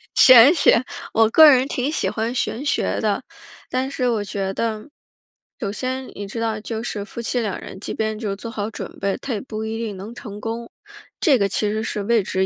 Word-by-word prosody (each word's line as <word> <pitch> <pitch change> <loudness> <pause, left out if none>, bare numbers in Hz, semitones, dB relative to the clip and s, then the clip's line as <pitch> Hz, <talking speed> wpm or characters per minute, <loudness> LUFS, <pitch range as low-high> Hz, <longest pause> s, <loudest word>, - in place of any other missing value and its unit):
玄 255 +2 +9
学， 285 -7 +4 0.3
我 225 -1 +4
个 310 +5 +8
人 260 -1 +4
挺 270 0 -2
喜 - - 0
欢 225 +2 -2
玄 255 +2 -2
学 285 - 0
的， 215 +3 0 0.5
但 260 +1 -1
是 255 -3 -1
我 220 -3 0
觉 195 -1 -3
得， 220 +4 -3 0.7
首 200 -5 -3
先， 260 +3 -4
你 205 - -6
知 220 +4 -6
道 225 -1 -1
就 220 +1 -5
是 210 -4 -4
夫 235 - -7
妻 245 +2 -1
两 215 -5 -2
人 - - -10
即 - - -5
便 220 -1 -2
就 215 - -3
是 195 - -2
做 215 +4 -8
好 210 0 -3
准 - - -8
备， 195 -1 -1
他 270 - -3
也 210 - -3
不 220 -4 -6
一 220 0 -3
定 220 -3 -4
能 205 +5 -8
成 210 -4 -9
功， 230 +1 -5 0.5
这 290 -6 +4
个 200 -3 +2
其 205 +2 0
实 215 +1 -2
是 210 -2 -3
未 225 0 +2
知 190 0 0
225 Hz, 240 characters per minute, -22 LUFS, 210-250 Hz, 0.7 s, 玄